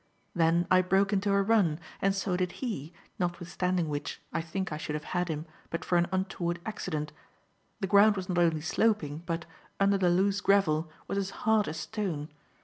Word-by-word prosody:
Then 170 +1 +3
I 185 0 +7
broke 195 +2 +2
into 200 0 +1
a 200 0 +3
run, 195 -8 +3 0.2
and 195 0 +2
so 195 -2 -1
did 180 -1 -1
he, 195 - -4 0.3
notwithstanding 175 0 -1
which, 145 -1 -4
I 165 - 0
think 185 +3 -4
I 150 - -2
should 150 -1 -4
have 150 - -4
had 175 0 +1
him 155 -1 -3 0.2
but 170 - -4
for 180 - +1
an 170 - +2
untoward 185 -2 -1
accident. 160 -8 -3 0.7
The - - +1
ground 205 +3 +6
was 190 -2 -4
not 180 -2 0
only 165 -3 +3
sloping, 160 -3 +1
but, 165 -1 -2 0.3
under 195 0 +3
the 180 -2 +3
loose 195 +3 +2
gravel, 170 -6 +3 0.2
was 200 - -1
as 195 -1 -2 0.2
hard 220 -1 +4
as 155 - -4
stone. 175 -9 -3
180 Hz, 190 wpm, -29 LUFS, 165-195 Hz, 0.7 s, I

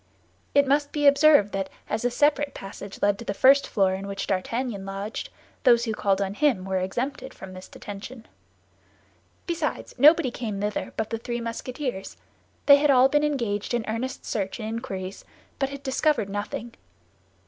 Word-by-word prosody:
It 285 0 +6
must 285 +1 +1
be 295 -1 -1
observed 280 -6 +6
that 195 -1 -2 0.2
as 220 - -2
a 245 - +2
separate 290 +2 +1
passage 195 0 -9
led 205 -1 +3
to - - -6
the 200 - -3
first 275 +6 +5
floor, 190 -3 +2
in 195 +1 -5
which 200 0 -4
D'Artagnan 205 +2 -2
lodged, 195 +3 -5 0.3
those 240 -3 +5
who 220 - -1
called 200 -2 +1
on 195 -1 -1
him 250 -7 +1
were 190 -1 0
exempted 260 +8 -4
from 190 -1 -10
this 185 0 -10
detention. 220 +4 -9 1.2
Besides, 340 -2 -3
nobody 300 -1 +6
came 220 -5 -4
thither 205 +1 -2
but 220 - -2
the 225 - -2
three 240 +1 -4
Musketeers; 235 -1 -5 0.5
they 280 -1 +9
had 295 +1 +2
all 260 -1 +6
been 295 +1 +2
engaged 240 -7 -1
in 235 -2 -2
earnest 245 +5 -4
search 200 0 -3
and 215 - -4
inquiries, 220 -5 -5 0.4
but 270 - 0
had 280 0 -8
discovered 275 -4 +1
nothing. 210 +3 -5
230 Hz, 170 wpm, -25 LUFS, 200-275 Hz, 1.2 s, they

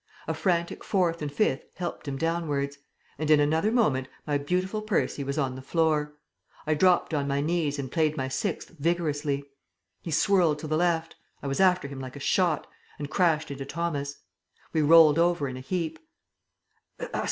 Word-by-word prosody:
A - - 0
frantic 170 -3 -1
fourth 175 -4 +1
and 150 -1 -3
fifth 140 -5 +1
helped 175 -3 -5
him 135 -1 -3
downwards... 145 -4 -1 0.4
and 155 -1 -2
in 155 -1 +6
another 160 +8 +2
moment 145 - +2 0.2
my 145 -1 0
beautiful 185 +8 -1
Percy 210 -8 -1
was 140 +2 -3
on 135 -4 0
the 130 - -8
floor. 150 0 0 0.5
I 155 - +2
dropped 180 +1 +3
on 140 -2 0
my 140 0 0
knees 155 -1 0
and 135 -3 -5
played 155 -2 +1
my 130 -1 -1
sixth 165 +8 -3
vigorously. 150 -3 0 0.6
He - - -7
swirled 170 -1 +3
to 155 - -6
the 155 - 0
left; 165 -1 0 0.3
I - - -3
was 135 - -2
after 185 -5 +4
him 140 -1 -8
like 130 0 -7
a - - -7
shot... 170 +2 +1 0.3
and 145 0 -6
crashed 165 -6 +2
into 135 -1 -5
Thomas. 145 -2 -3 0.6
We 160 - +2
rolled 155 0 +7
over 170 -4 +2
in 130 - -5
a - - -6
heap. 165 +4 -3
155 Hz, 175 wpm, -27 LUFS, 140-170 Hz, 0.6 s, rolled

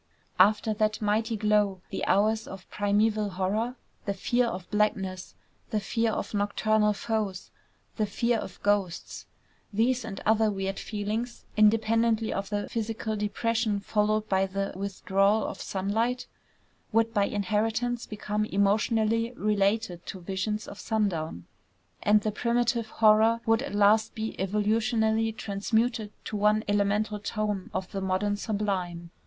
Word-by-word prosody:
After 210 +3 +4
that 215 0 0
mighty 220 +2 0
glow, 210 -2 +2
the - - -3
hours 215 +2 +2
of 190 -1 -9
primeval 210 +1 +1
horror, 200 +6 -1 0.3
the 200 - -1
fear 240 +5 +1
of 180 -4 -5
blackness, 195 -3 -1 0.3
the 215 - 0
fear 225 +2 0
of 205 - -4
nocturnal 210 +1 +2
foes, 205 -3 -3 0.5
the 215 -2 +1
fear 235 +3 0
of 180 - -8
ghosts. 200 -4 -1 0.4
These, 240 +4 +1
and 195 - -6
other 220 0 +4
weird 195 -1 -3
feelings, 220 +3 -4
independently 225 +1 +3
of 195 0 -3
the 205 -1 -2
physical 220 -1 -3
depression 215 +1 0
following 210 +1 +1
the 195 0 0
withdrawal 195 +2 +1
of - - -5
sunlight, 220 +6 -1 0.7
would 225 0 +2
by 205 -3 +3
inheritance 220 +4 -1
become 210 0 -2
emotionally 220 +3 +1
related 205 -4 0
to 190 - -6
visions 195 +4 -3
of 200 - -9
sundown; 170 - -1 0.6
and 210 0 +4
the 215 - -1
primitive 235 0 0
horror 220 +1 +4
would 225 +1 +3
at 275 -6 -5
last 210 +1 +4
be 220 0 -3
evolutionally 220 +3 +1
transmuted 220 +2 -1
to - - -4
one 210 +1 +3
elemental 205 +1 +1
tone 210 -2 -2
of 185 - -4
the 195 - -3
modern 190 +2 0
sublime. 190 -5 -3
210 Hz, 135 wpm, -28 LUFS, 200-225 Hz, 0.7 s, After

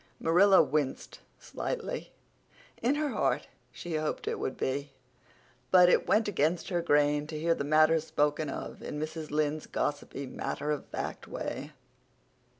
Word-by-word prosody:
Marilla 185 +3 +6
winced 145 -1 -2 0.2
slightly. - - -4 0.7
In 255 +5 +2
her 300 0 0
heart - - 0 0.2
she 175 - -7
hoped 155 0 -3
it - - -1
would, - - -3 1.1
but 180 -1 +7
it - - +3
went 220 0 +3
against 170 -3 0
her 175 -2 0
grain 145 -2 +2
to 155 - -5
hear 165 +2 +2
the 140 - -3
matter 155 +2 +4
spoken 150 -1 0
of - - -6
in 150 - -5
Mrs. 155 0 -5
Lynde's 150 0 -1
gossipy 145 -1 -3
matter 140 +3 -3
of 150 - -3
fact - - -5
way. 145 +3 -5
155 Hz, 145 wpm, -30 LUFS, 145-175 Hz, 1.1 s, but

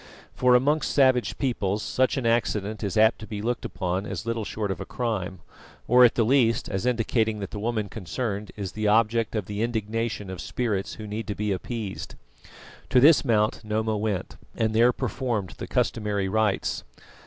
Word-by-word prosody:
For 125 -1 +4
amongst 145 +5 +2
savage 130 -3 +3
peoples 105 -6 -1
such 130 +2 +1
an 130 - -2
accident 110 -2 0
is 100 0 -2
apt 110 +1 +5
to 110 - -9
be 105 - -5
looked 120 +3 -2
upon 95 +2 -2
as - - -5
little 115 -1 -2
short 105 -1 -3
of 90 - -4
a - - -2
crime, 100 -7 -3 0.5
or, 125 +1 +7
at 120 - +6
the 115 - +3
least, 115 -1 +3
as 95 +4 -2
indicating 115 -2 +1
that 100 -2 -6
the 105 - -5
woman 110 -1 -1
concerned 105 +1 -4
is 100 -3 -5
the 110 -1 -2
object 115 +1 +2
of 105 -3 -1
the 105 +2 -4
indignation 115 -3 -2
of 90 -3 -6
spirits 105 -4 -2
who 110 - -8
need 105 +2 -5
to 105 - -3
be 105 0 -1
appeased. 105 +1 -5 0.7
To 130 - +5
this 150 +4 +7
Mount, 110 -4 +1
Noma 110 +1 -1
went, 105 -3 -3 0.2
and 110 -1 0
there 120 +3 +5
performed 120 - -2
the - - -5
customary 105 -3 0
rites. 105 0 0
110 Hz, 185 wpm, -26 LUFS, 105-120 Hz, 0.7 s, or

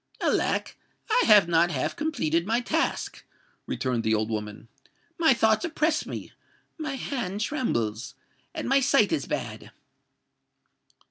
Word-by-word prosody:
"Alack! - - 0 0.4
I - - +4
have 210 -5 +7
not 170 0 +3
half 140 -6 -2
completed 195 - -1
my 230 +2 +2
task," 315 +7 -2 0.4
returned 125 -3 -1
the 110 0 +2
old 110 +1 -1
woman: 105 0 -5 0.5
"my 320 -3 +5
thoughts 220 -3 +3
oppress 315 -2 0
me—my 310 -4 -8
hand 225 -8 -4
trembles—and 130 - -4
my 270 +2 +4
sight 270 -5 +3
is 320 - -1
bad." - - -5
215 Hz, 120 wpm, -26 LUFS, -, 0.5 s, have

